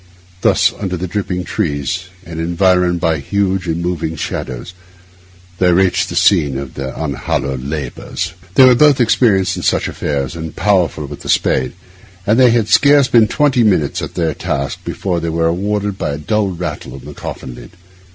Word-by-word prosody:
Thus, - - +3
under 95 -3 -3
the 90 - -3
dripping 90 -1 -3
trees, 90 -1 -2 0.2
and 85 -1 -7
environed 90 +1 +2
by 80 -2 +1
huge 95 +2 -1
and 85 +1 -2
moving 85 -2 -2
shadows, 65 +1 -5 0.9
they 90 -1 +4
reached 90 0 +2
the - - -5
scene 70 -3 +3
of 70 -2 -6
their 65 -1 -5
unhallowed 70 -3 -2
labours. 75 +5 -4 0.2
They 130 - +8
were 130 - +7
both 145 +2 +4
experienced 105 -6 +2
in - - -4
such - - +1
affairs, 70 -2 -3
and 80 -1 -6
powerful 90 -7 +1
with 70 0 -9
the - - -9
spade; 65 - +1 0.5
and 110 +4 +3
they 125 -1 +7
had 115 -2 +2
scarce 140 +6 +5
been 115 -3 +5
twenty 135 -3 +2
minutes 90 -10 +1
at - - -6
their 80 -3 0
task 70 -1 -3
before 90 -3 -2
they 85 0 -3
were 80 0 0
rewarded 100 +3 -1
by - - -2
a - - -4
dull 105 +7 0
rattle 85 -7 -5
on 70 - -11
the 75 - -9
coffin 65 -2 -7
lid. - - -13
90 Hz, 180 wpm, -16 LUFS, 75-100 Hz, 0.9 s, They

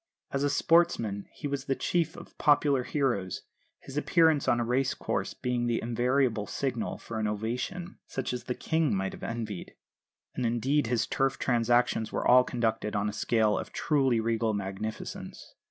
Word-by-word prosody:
As 140 0 -1
a 145 - +2
sportsman 145 - +2
he - - -5
was 140 -1 -3
the 135 - 0
chief 165 +1 0
of - - -12
popular 145 -2 +4
heroes, 120 - -1 0.4
his 135 - -9
appearance 160 -1 +3
on 120 - +3
a 120 - 0
race 125 +3 +1
course - - -2
being 125 -1 -1
the 120 -1 +1
invariable 120 -1 +1
signal 125 -5 -2
for 115 -1 -6
an 110 - 0
ovation, 125 - -3
such 130 -1 -3
as 120 -1 -5
the 125 - -2
King 160 -7 +1
might 95 0 -2
have - - -10
envied. 110 -5 -5 0.6
And, 125 - -3
indeed, 120 +4 +1
his 120 0 +1
Turf 135 0 0
transactions 120 -2 +2
were - - -1
all 125 +1 +7
conducted 110 -4 -1
on 105 +1 +1
a - - -6
scale 110 0 +2
of - - -7
truly 135 -6 +2
regal 115 -1 0
magnificence. 100 +2 -6
120 Hz, 170 wpm, -29 LUFS, 110-140 Hz, 0.6 s, all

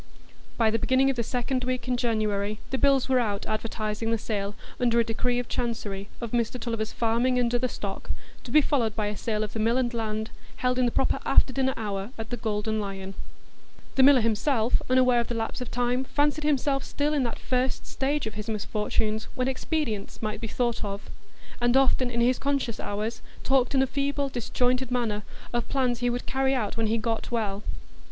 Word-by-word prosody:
By 225 -2 +4
the 225 - +1
beginning 265 +1 +3
of - - -4
the 240 - 0
second 250 +2 -1
week 255 0 -2
in 250 - +2
January, 215 -3 0
the 265 - 0
bills 275 -2 +4
were 260 -1 +4
out 205 -4 -1
advertising 215 0 -2
the 230 - +2
sale, 205 -2 -3 0.2
under 235 -2 +3
a - - +5
decree 245 +2 0
of 245 -1 -2
Chancery, 210 -5 -3
of 235 -2 -5
Mr 240 +1 0
Tulliver's 225 -2 -2
farming 235 +2 +1
and 240 -1 +2
other 245 +1 +2
stock, 200 -5 -6 0.3
to - - -9
be 305 +5 +6
followed 240 -7 +1
by 215 - 0
a 210 - -4
sale 215 0 -1
of 210 - -5
the 225 - -3
mill 230 +3 +3
and 250 -2 +1
land, 220 -1 -2 0.2
held 250 0 0
in 250 - +4
the - - 0
proper - - +1
after 260 - +4
dinner 265 0 +1
hour 200 -2 -3
at 225 +1 -6
the 245 - -1
Golden 220 0 -1
Lion. 195 -1 -5 0.8
The 270 - +3
miller 265 -1 +7
himself, 230 +2 +2
unaware 255 -1 +5
of 235 - 0
the 240 - -3
lapse 225 +2 -3
of 250 - -4
time, 245 +1 0
fancied 295 +2 +1
himself 275 -2 +2
still 295 +1 -1
in 290 - +2
that 235 - -3
first 255 0 -1
stage 280 +1 -1
of 220 - -4
his 210 +1 -5
misfortunes 215 +1 -1
when 255 0 0
expedients 260 -6 -2
might 215 0 -3
be 225 - -2
thought 240 +1 -1
of; 200 0 -5 0.5
and 240 +2 +4
often 260 -1 +3
in 235 -1 0
his 250 +2 +3
conscious 275 -5 -1
hours 215 +3 -3 0.2
talked 265 0 +2
in 265 - +5
a - - +3
feeble, 280 +1 -1
disjointed 250 +1 0
manner 235 -4 0 0.3
of 240 -1 -1
plans 250 -4 +1
he 245 0 +1
would 245 +1 -2
carry 270 0 +1
out 215 -6 -1
when 225 -1 +1
he 225 +2 +2
"got 225 0 -2
well." 210 -4 -1
240 Hz, 205 wpm, -27 LUFS, 220-255 Hz, 0.8 s, miller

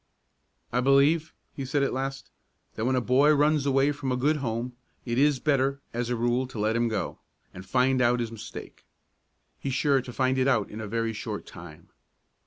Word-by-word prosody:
"I 125 - +2
believe," 140 +5 +3 0.2
he 135 - -5
said 140 +2 0
at 140 - 0
last, 135 +1 -4 0.4
"that 110 - -3
when 130 +1 +2
a 125 - +1
boy 135 +5 +4
runs 150 0 +2
away 135 +1 +3
from 140 -2 -4
a 125 - 0
good 150 +5 +2
home, 120 -2 -3 0.3
it 120 0 -1
is 145 0 +4
better, 140 -1 +1
as 120 0 -2
a 125 - 0
rule, 120 +2 0
to 130 - -10
let 110 +2 0
him 120 0 +2
go, 110 -3 -3 0.3
and 95 - -9
find 130 +4 +2
out 120 0 +3
his 115 -1 -3
mistake; 115 -2 -9 0.8
he's 135 -2 -3
sure 140 -2 +2
to 125 - -9
find 130 +1 +1
it 130 - +2
out 115 -7 +1
in 110 - -6
a 110 - -5
very 115 +1 -1
short - - -5
time. - - -12
130 Hz, 200 wpm, -27 LUFS, 120-140 Hz, 0.8 s, boy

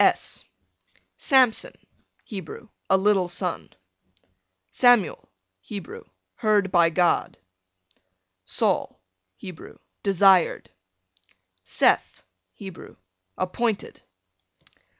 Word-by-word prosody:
S - - +1 0.7
Samson, 260 - +2 0.5
Hebrew, 200 +2 -9 0.2
a 190 - +5
little 190 -2 +2
son. 175 0 -3 1.0
Samuel, 245 - +3 0.3
Hebrew, 190 - -9 0.3
heard 205 -3 +1
by 170 -2 +4
God. 175 +1 +1 1.1
Saul, - - -1 0.4
Hebrew, 180 - -11 0.2
desired. 195 - +3 0.9
Seth, - - +1 0.3
Hebrew, 190 -3 -11 0.4
appointed. 215 +3 -2
195 Hz, 70 wpm, -24 LUFS, 180-215 Hz, 1.1 s, a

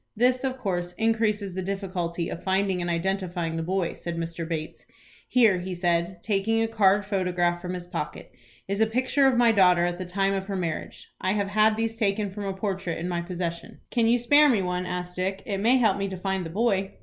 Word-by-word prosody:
"This 250 +2 +3
of 260 -1 -1
course 180 -7 -2
increases 220 -3 0
the 190 - -3
difficulty 180 -3 -3
of - - -6
finding 190 -1 +1
and 175 - -2
identifying 175 -1 -1
the 165 - -2
boy," 180 +1 -1
said 170 -1 -6
Mr. 165 0 -4
Bates. 160 -2 -5 0.4
"Here," 225 -7 +4
he 180 +1 -5
said, 175 0 0
taking 215 +2 +1
a - - +1
card 205 -2 +3
photograph 180 -3 0
from 180 0 -4
his 180 -1 -6
pocket, 175 -4 -6 0.4
"is 200 +2 -1
a 220 - +5
picture 255 +4 +2
of 260 -2 +3
my 240 -1 +5
daughter 180 -4 +5
at 175 0 -2
the 185 - -4
time 195 +2 0
of 195 -1 -2
her 200 0 -4
marriage. 170 -4 -4
I 185 +1 +1
have 200 -1 -1
had 215 +1 +3
these 225 0 -1
taken 205 -2 0
from 205 +1 -6
a 195 - -2
portrait 190 -3 -3
in 170 - -4
my 175 -1 -1
possession." 170 -1 -5
"Can 235 -2 +2
you 235 +1 +4
spare 290 +5 +5
me 215 -7 +2
one?" 180 0 -2
asked 180 0 -4
Dick. 190 +1 -2
"It 200 -3 -2
may 235 +6 +4
help 220 -6 +3
me 200 - -1
to 190 - -5
find 190 -1 -2
the - - -8
boy." 195 0 0
190 Hz, 220 wpm, -26 LUFS, 175-215 Hz, 0.4 s, a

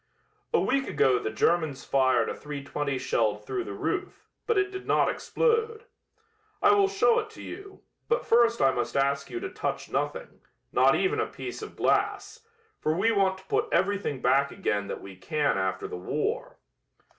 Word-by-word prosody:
"A 465 - +3
week 270 +1 +1
ago 125 -2 +3
the 110 - -3
Germans 150 +5 0
fired 130 -1 +3
a - - -2
.320 140 -1 -4
shell 110 -4 +1
through 120 +4 -4
the 100 - -7
roof, 160 +10 -3 0.2
but 460 - +2
it 395 0 +1
did 380 0 -7
not - - +3
explode. 455 -2 0 0.8
I 410 - +5
will 400 -1 +4
show 445 +4 +3
it 440 0 -5
to 435 - -12
you, 390 +2 -10 0.2
but 470 +1 0
first 235 0 +4
I 135 - +5
must 120 0 -2
ask 140 +1 +1
you 360 - -4
to 385 - -4
touch - - -4
nothing, - - -3 0.3
not - - +4
even 425 +3 +1
a 435 - 0
piece - - -7
of - - -8
glass, 455 - 0 0.4
for 155 - 0
we 225 +5 +3
want 195 -3 +2
to 190 - -16
put - - -1
everything 190 -7 0
back 135 +2 +3
again 105 - -1
that - - -5
we 95 -1 -10
can 145 +9 0
after 95 0 -2
the - - -6
war." 90 - -3
175 Hz, 180 wpm, -27 LUFS, -, 0.8 s, I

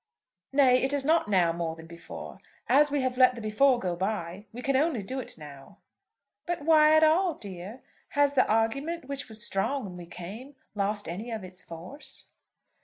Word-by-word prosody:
"Nay, 265 -2 +5
it 270 +1 0
is 280 -1 +1
not 320 -4 +3
now 180 -5 +3
more 165 -1 -3
than 160 0 -12
before. 170 +1 -10 0.3
As 295 +2 +5
we 285 -1 0
have 255 0 -2
let 255 -1 +6
the - - -7
before 245 +5 +3
go 180 -6 -2
by, 190 0 -3
we 245 +2 -8
can 275 -1 +1
only 275 -6 +1
do 260 +7 -4
it 255 - -7
now." 140 -3 -12 0.7
"But 345 -4 -2
why 310 0 +6
at 315 - +5
all, 330 +2 +3
dear? 195 +5 -8 0.3
Has 285 -1 +4
the 260 - +3
argument, 275 +10 0
which 280 -2 -4
was 220 +1 0
strong 245 +7 -1
when 180 -2 -8
we 175 -1 -9
came, 215 +12 -9 0.2
lost 205 0 -2
any 195 +8 -5
of 220 -4 -4
its 185 0 -9
force?" 265 - -10
235 Hz, 190 wpm, -28 LUFS, 185-280 Hz, 0.7 s, let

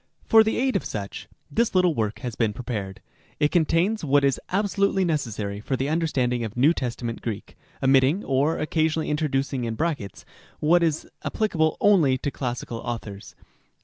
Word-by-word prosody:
For 225 -1 +7
the 220 - -1
aid 260 -1 +1
of 195 - +1
such, 100 -2 -6 0.2
this 230 -3 +1
little 180 -2 +4
work 110 -5 -2
has 125 -4 -4
been 110 -3 0
prepared. 105 -5 -5 0.4
It 150 - +2
contains 175 +5 +2
what 145 -1 +3
is 140 -1 +1
abso 200 +1 -1
lutely 195 -1 +3
necessary 110 - -2
for 130 +5 -2
the 135 +2 -1
understanding 130 -7 0
of 110 +1 -6
New 145 +7 +5
Testament 120 -4 -4
Greek, 110 -4 -5 0.3
omitting 135 +7 +4
(or 140 +4 +1
occasionally 155 0 0
introducing 140 -4 -1
in 115 -1 -2
brackets) 145 - -3 0.3
what 170 +3 +4
is 160 -2 0 0.2
appli 215 -2 -1
cable 160 -2 +1
only 165 -11 +4
to 145 +2 -3
classical 120 -3 -4
authors. 110 -4 -6
140 Hz, 170 wpm, -25 LUFS, 120-170 Hz, 0.4 s, For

